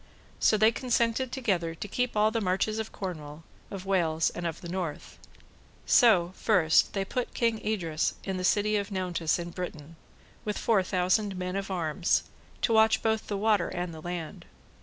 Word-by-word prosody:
So 215 - +4
they 220 +2 +5
consented 240 +1 0
together 185 -11 -1
to 205 - -6
keep 250 +2 -2
all 215 +1 +4
the 225 0 -1
marches 200 +3 0
of 220 - -4
Cornwall, 155 -5 -7 0.3
of 195 -1 -7
Wales, 165 -5 +1
and 175 -1 -4
of 165 - -5
the 175 - -7
North. 175 -4 -5 0.7
So 190 -8 +5
first, 175 -7 +3
they 195 -1 -1
put 250 +5 -3
King 230 -2 +1
Idres 170 -7 -1
in 190 -1 -3
the 185 - -3
City 210 +2 +2
of 200 0 -3
Nauntes 180 -5 -1
in 175 0 -6
Britain, 165 -3 -7 0.5
with 210 -1 -3
four 220 -4 +2
thousand 185 +2 0
men 180 0 -3
of 195 0 -3
arms, 170 -2 0 0.4
to 230 - +2
watch 220 0 +4
both 220 -1 0
the 205 - -2
water 210 -3 +2
and 175 -1 -4
the 160 - -9
land. 175 -2 -6
190 Hz, 180 wpm, -28 LUFS, 170-215 Hz, 0.7 s, they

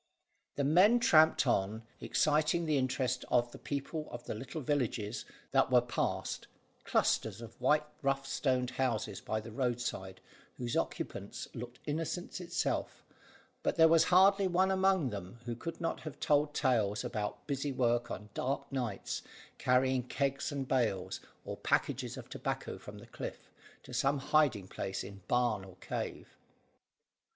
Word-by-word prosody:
The 140 - 0
men 185 - +6
tramped 160 -8 +6
on, 105 +4 +1 0.2
exciting 155 +3 +2
the 150 -3 +2
interest 130 -1 0
of 120 -1 +3
the - - -10
people 150 +2 -3
of 120 0 -7
the - - -4
little 130 +8 -6
villages 120 -5 -1 0.3
that 135 0 +4
were 125 -1 +7
passed 120 0 -2 0.4
clusters - - +1
of 115 -1 -11
white 150 0 +4 0.2
rough 135 0 +1
stone 130 -2 +1
houses 130 -1 -1
by 110 - -2
the 110 +1 -9
roadside, 120 -6 -2 0.4
whose 120 -2 -3
occupants - - -3
looked 120 +1 -7
innocence 165 +4 -3
itself, 175 0 -2 0.6
but - - 0
there 160 -1 +7
was 165 0 +5
hardly 195 +2 +6
one 185 +2 +3
among 190 -7 +3
them 100 +1 -7
who 120 -1 -3
could 165 +8 -6
not 165 - -1
have 155 -3 -8
told 145 0 +2
tales 110 -5 +2
about 110 -4 -3
busy 140 0 -1
work 120 -2 +1
on 105 +2 -6
dark 140 +2 -2
nights, 120 -7 -2 0.4
carrying 130 0 +3
kegs 140 +4 -1
and 140 -2 -3
bales, 115 -9 0 0.3
or - - -5
packages - - 0
of - - -8
tobacco - - -4
from - - -10
the - - -11
cliff, - - -7 0.3
to - - -11
some 140 +1 +2
hiding 135 -8 +2
place 95 0 -4
in 100 0 -9
barn 120 -5 +2
or 95 -1 -12
cave. - - -5
130 Hz, 150 wpm, -33 LUFS, 120-150 Hz, 0.6 s, were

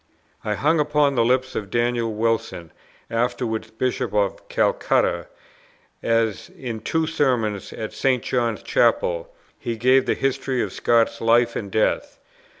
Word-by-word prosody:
I 105 - -1
hung 155 +9 +2
upon 150 -1 +2
the 120 -3 +2
lips 130 +2 +1
of 100 -2 -4
Daniel 120 0 0
Wilson, 110 -6 -2 0.4
afterwards 115 -1 -1
Bishop 120 +2 -2
of 100 -2 -1
Calcutta, 85 -1 +1 0.7
as 115 -3 0
in 120 -4 -6
two 160 +8 0
sermons 125 -10 0
at 110 - -6
St. 130 -3 +1
John's 120 -3 -1
Chapel - - +1 0.3
he 115 -1 -4
gave 130 +3 +4
the - - +2
history 135 -1 -1
of - - -5
Scott's 115 -1 +2
life 115 +1 +3
and 100 - -4
death. 110 +2 0
120 Hz, 140 wpm, -23 LUFS, 110-130 Hz, 0.7 s, gave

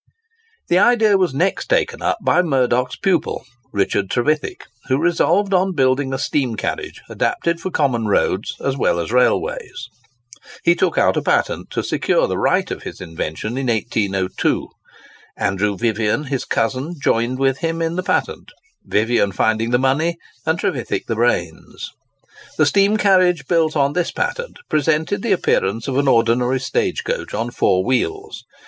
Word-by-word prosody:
The 175 - +3
idea 220 -1 +4
was 185 -3 +2
next 175 +8 -1
taken - - 0
up - - 0
by 180 - +4
Murdock's 125 -5 +1
pupil, 180 -7 -1 0.3
Richard 100 -1 0
Trevithick, 150 +5 -1 0.2
who 130 - +2
resolved 175 +5 +2
on 185 0 +2
building 135 0 +1
a 130 - -1
steam 135 -3 -1
carriage - - -4
adapted 170 0 -1
for 185 - -3
common 130 -10 0
roads 100 -1 0
as 135 - 0
well 85 -9 +1
as 85 - -3
railways. 410 - 0 0.7
He 170 - +5
took 175 -1 0
out - - +3
a - - +1
patent - - 0
to - - -3
secure - - +1
the - - -2
right - - +1
of - - -5
his - - -8
invention 80 +9 -4
in 135 - -2
1802. 100 -5 -1 0.7
Andrew 100 +1 0
Vivian, 110 +4 0
his 135 -3 -3
cousin, 130 +9 -1
joined 120 -1 0
with 135 -1 +1
him 165 0 -2
in 165 0 -1
the 185 - -1
patent—Vivian 120 - -1
finding 110 +3 0
the 120 - +3
money, 145 +6 +1 0.3
and 160 +1 +2
Trevithick 130 -6 -2
the 115 - -2
brains. 100 -8 -2 0.7
The 155 - +4
steam 200 +7 +3
carriage 185 -7 +3
built 165 -2 +1
on 140 0 +2
this 175 +1 0
patent 480 +7 -3
presented 155 +5 0
the 230 - -1
appearance 110 - 0
of 135 0 0
an 140 - +1
ordinary 120 +1 +2
stage 130 - -1
coach - - -3
on 115 +3 -2
four 95 -5 +2
wheels. 405 - -2
135 Hz, 155 wpm, -19 LUFS, 115-175 Hz, 0.7 s, He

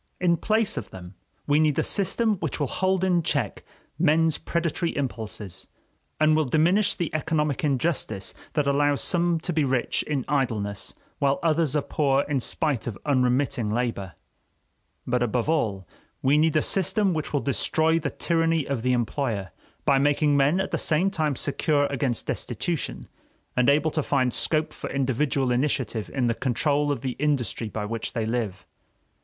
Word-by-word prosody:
In 175 -1 +3
place 215 +4 +1
of - - -4
them 90 0 -10 0.3
we 145 +1 +3
need 155 -3 +2
a - - +2
system 215 +2 +1
which 160 -5 -3
will 145 - +1
hold 185 +5 0
in 180 -2 +3
cheek 140 -9 -2 0.4
men's 160 -1 +3
predatory 170 0 -1
impulses, 110 -8 -4 0.5
and 155 0 +4
will 155 - +3
diminish 175 +9 +2
the 170 -4 -3
economic 155 -2 0
injustice 135 - -1 0.2
that 150 -2 +1
allows 145 0 +2
some 175 -1 +1
to 175 - -3
be 155 -1 +2
rich 130 -3 +1
in 140 -4 -2
idleness 110 -9 -2 0.2
while 140 0 +2
others 160 -3 +2
are 150 - +1
poor 140 -2 +1
in 145 -2 -1
spite 135 -1 -1
of 110 -5 -4
unremitting 125 -4 +1
labor; 110 -6 -2 0.9
but 125 0 0
above 120 +1 0
all 105 - 0 0.4
we 135 +2 +4
need 155 +1 +3
a 155 - +2
system 195 +1 +2
which 155 -2 -3
will 145 - +1
destroy 160 +4 +1
the 150 -2 -2
tyranny 165 -2 0
of 135 -4 -2
the 125 +1 +1
employer, 115 -5 -1 0.3
by 140 -1 +4
making 145 +1 +3
men 140 +6 +3
at 190 - -2
the - - -1
same 170 +5 +2
time 155 -6 0
secure 145 +2 +1
against 130 -4 -1
destitution - - -3 0.5
and 125 +1 +3
able 150 +2 +3
to 155 - 0
find 130 -4 +1
scope 155 +7 0
for - - -6
individual 135 0 0
initiative 125 -4 -1
in 130 -3 0
the 115 - +2
control 145 +4 +1
of 140 - -2
the 130 -2 -3
industry 135 -6 -1
by 105 0 -4
which 115 +1 -4
they 115 -3 -1
live. 110 -4 -3
145 Hz, 170 wpm, -25 LUFS, 125-160 Hz, 0.9 s, and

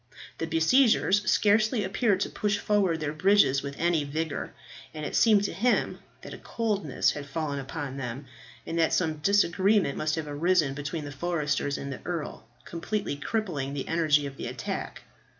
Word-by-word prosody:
The 165 - -2
besiegers 205 +4 +3
scarcely 215 +2 +3
appeared 195 0 +1
to - - 0
push 210 0 0
forward 200 -6 +1
their 150 -1 -3
bridges 155 -5 +4
with 140 0 -6
any 170 -2 +1
vigour, 155 +1 -3 0.4
and 155 -1 -5
it - - -4
seemed 215 -3 +5
to 205 - -2
him 235 +8 +1 0.2
that - - -8
a - - -9
coldness 205 - -1
had 145 -1 -7
fallen 145 -1 -3
upon 135 0 -6
them, 130 +1 -5 0.4
and 165 - -3
that 160 - +2
some 160 -3 0
disagreement 195 -1 +2
must 155 0 0
have 160 -2 -4
arisen 150 0 +1
between 145 +2 -5
the 145 - -6
foresters 150 -2 -1
and 140 0 -5
the - - -9
earl, 155 -10 -5 0.2
completely 175 0 -3
crippling 145 -5 -3
the 135 - -4
energy 155 -3 +2
of 135 -1 -7
the - - -5
attack. - - -5
160 Hz, 170 wpm, -27 LUFS, 145-200 Hz, 0.4 s, seemed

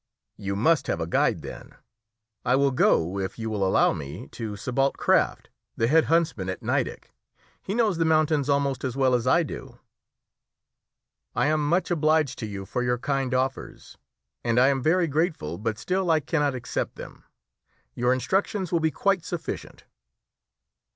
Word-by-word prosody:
"You 100 0 -3
must 140 +7 +2
have - - -1
a 80 - -1
guide, 85 - +1
then. - - -10 0.7
I 125 +1 +3
will 140 0 +3
go, 95 -6 +2
if 95 -1 -4
you 110 -1 -4
will 105 -2 -1
allow 95 - +3
me, 70 0 -7
to 110 -3 -6
Sébalt 130 +6 0
Kraft, - - +1 0.3
the 115 - +2
head 155 +6 +4
huntsman 160 - +1
at 95 - -5
Nideck. - - -2 0.5
He 195 - -4
knows 215 -7 +1
the - - +3
mountains 155 -3 +2
almost 140 -1 +1
as 130 -1 -3
well 130 -2 +3
as 125 0 +1
I 170 +6 +4
do." 150 - -8 1.6
"I - - +2
am 150 -1 +1
much 175 +2 +1
obliged 155 -4 +2
to 110 - -4
you 100 -2 -6
for 125 - -3
your 125 0 +1
kind 135 0 -1
offers, 130 +1 -3 0.4
and 120 0 +2
I 130 +2 +6
am 135 -1 0
very 175 +5 +3
grateful, 150 - -1
but 110 0 -2
still 185 +6 -1
I 160 -1 +4
cannot 145 -2 0
accept 125 0 -3
them. - - -11 0.7
Your 125 +1 +1
instructions 190 +7 0
will 170 - +2
be 160 0 +2
quite 195 +2 0
sufficient." 170 -2 -6
135 Hz, 170 wpm, -25 LUFS, 115-160 Hz, 1.6 s, I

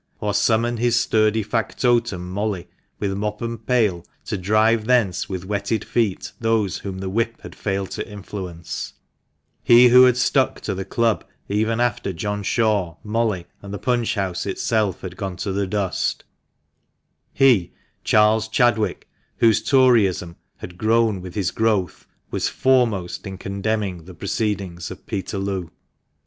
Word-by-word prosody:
" - - -42
or 105 -1 -1
summon 115 +4 +2
his 120 +1 +2
sturdy 110 0 +2
factotum 115 -3 0
Molly, 100 -1 -3 0.3
with 100 -2 -2
mop 105 +1 -3
and 115 0 -5
pail, 105 -9 +2 0.2
to - - -3
drive 110 +3 +2
thence 115 -8 +2
with 95 -2 -4
wetted 100 +2 -2
feet 110 -6 -1
those 115 -4 0
whom 95 -2 -6
the 95 0 -5
whip 115 +2 -1
had - - -9
failed 95 -2 -3
to - - -5
influence 95 -4 -6 0.3
— - - -49 0.3
he 120 +1 +7
who 125 +1 +8
had 125 -1 +4
stuck 125 - +2
to - - -3
the 95 0 -4
club 115 -2 +1 0.2
even 110 +3 0
after 120 -4 0
John 105 +4 -3
Shaw, 100 -5 +1
Molly, 105 -4 -1 0.2
and 100 - -9
the 100 - -4
punch 120 0 0
house 95 -2 -2
itself 100 0 0
had 90 -1 -7
gone 95 -2 -4
to 100 - -3
the 100 0 -1
dust 95 -3 -1 0.6
— - - -50 0.2
he, 125 -10 +4 0.3
Charles 110 +1 +4
Chadwick, 110 -1 +1 0.3
whose 110 -2 +4
Toryism 110 -9 +3 0.2
had 90 0 -10
grown 110 -3 +2
with 90 -1 -9
his 95 -4 0
growth, 110 -5 0 0.2
was - - 0
foremost 115 -9 +1
in 95 -1 -6
condemning 100 -3 -3
the 90 0 -11
proceedings 100 -4 -3
of - - -10
Peterloo. 95 -2 -3
105 Hz, 155 wpm, -22 LUFS, 95-115 Hz, 0.6 s, who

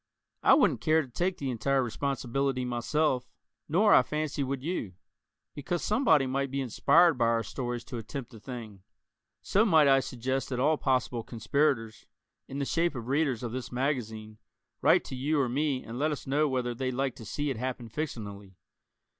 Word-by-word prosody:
I - - +6
wouldn't - - +3
care 160 0 +3
to - - -11
take 175 +9 -2
the 135 -2 -3
entire 135 +3 +1
responsibility 135 +1 -1
myself, 125 +1 0 0.4
nor 200 +7 +4
I - - +8
fancy 150 +2 -2
would 135 0 -3
you 150 - -3 0.6
because 160 +4 -3
somebody 215 - +3
might 135 +1 -1
be 135 +1 -3
inspired 145 +5 +4
by 115 - +3
our 115 0 +1
stories 120 +2 -4
to 120 -1 -6
attempt 125 +2 -7
the 115 - -12
thing 110 -4 -8 0.6
so 205 - +3
might 160 -9 +5
I 135 -1 +6
suggest 130 +1 -3
that 125 -2 -2
all 155 +4 +3
possible 130 -3 0
conspirators, 115 0 -1 0.4
in 135 - -6
the 140 - -1
shape 170 +1 0
of 120 0 -6
readers 140 -4 +1
of 120 - -3
this 130 +1 -5
magazine, 110 -5 -3 0.4
write - - +5
to - - -6
you 145 +4 0
or 135 - +2
me 135 +1 -1
and 115 +2 -7
let 150 +2 +2
us 150 - -4
know 145 +3 +2
whether 125 -2 -1
they'd 130 +1 -3
like 135 -1 0
to - - -9
see 145 +7 -2
it 130 - -4
happen 125 0 -4
fictionally? 105 - -6
130 Hz, 185 wpm, -29 LUFS, 120-145 Hz, 0.6 s, I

